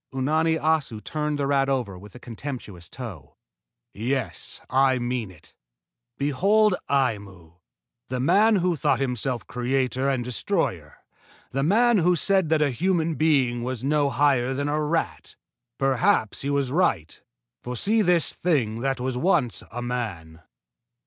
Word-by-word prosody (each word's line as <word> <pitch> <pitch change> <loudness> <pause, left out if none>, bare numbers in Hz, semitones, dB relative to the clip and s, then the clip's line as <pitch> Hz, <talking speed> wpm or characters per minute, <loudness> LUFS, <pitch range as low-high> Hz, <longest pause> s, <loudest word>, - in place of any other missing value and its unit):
Unani 155 +5 +1
Assu 150 -8 0
turned 150 +4 -2
the 140 - -1
rat 135 -1 +2
over 125 -8 -1
with 95 +2 -13
a - - -10
contemptuous 115 - -8
toe. 80 - -9 0.6
"Yes, 130 +5 -3
I 130 0 +3
mean 120 -3 -2
it. 90 -4 -17 0.6
Behold 195 +10 +3 0.2
Aimu, 100 - -2 0.5
the 130 0 -2
man 200 - +4
who 180 -2 +1
thought 145 -4 +1
himself 125 -2 -2
creator 130 +1 -1
and 130 -3 0
destroyer 125 -2 -2 0.5
the 135 - -1
man 220 - +4
who 180 +1 +3
said 190 0 +2
that 155 -1 +3
a 145 - +1
human 165 +3 0
being 135 -7 +2
was 125 0 -4
no 145 0 +2
higher 135 -1 +2
than 145 +1 -2
a 150 +1 0
rat! 150 - -2 0.4
Perhaps 130 -5 +1
he 140 - -3
was 140 -2 0
right, 135 - 0 0.4
for 125 +1 -5
see 215 - +2
this 175 -4 +2
thing 125 -11 0
that 135 0 -1
was 125 0 -2
once 155 - +1
a 120 - -6
man!" 95 -10 -5
135 Hz, 145 wpm, -24 LUFS, 120-155 Hz, 0.6 s, man